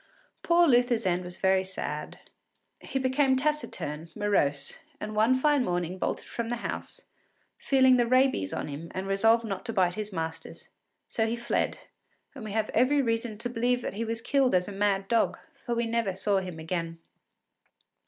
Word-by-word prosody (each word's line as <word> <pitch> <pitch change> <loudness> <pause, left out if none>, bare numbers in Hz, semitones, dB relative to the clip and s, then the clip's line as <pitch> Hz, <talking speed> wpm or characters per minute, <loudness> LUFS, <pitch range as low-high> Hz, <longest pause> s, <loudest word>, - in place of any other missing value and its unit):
Poor 345 0 +4
Luther’s 245 -4 +3
end 180 0 +1
was 180 0 -7
very 190 0 +3
sad. 190 0 -5 0.6
He - - -4
became 265 +1 +2
taciturn, 255 - -2
morose, 145 -9 0 0.2
and 215 0 -5
one 220 +4 +4
fine 290 0 +3
morning 180 -2 -2
bolted - - -2
from 235 -1 -4
the 240 - 0
house, - - -5 0.6
feeling 260 -2 +4
the 240 -1 +2
rabies 255 - +2
on - - -3
him 150 +3 -7
and 190 +1 -3
resolved 225 +4 +3
not 195 -3 -4
to 230 - -4
bite 185 -4 +2
his 215 +1 -5
masters; 160 -2 -6 0.4
so 225 -1 0
he 230 - -1
fled, 235 0 -1 0.6
and 265 -5 -9
we 215 - -6
have 220 -1 -1
every 255 +5 +3
reason 230 -2 -1
to 230 - -4
believe 245 +1 0
that - - -3
he 215 +3 -3
was 230 0 -3
killed 265 -2 +2
as 180 0 +2
a - - -5
mad 195 -1 0
dog, 230 +1 +2 0.3
for 240 - -2
we 235 0 0
never 230 -4 -1
saw 195 +1 +1
him 180 -3 -6
again. 165 0 -4
220 Hz, 180 wpm, -28 LUFS, 190-245 Hz, 0.6 s, Poor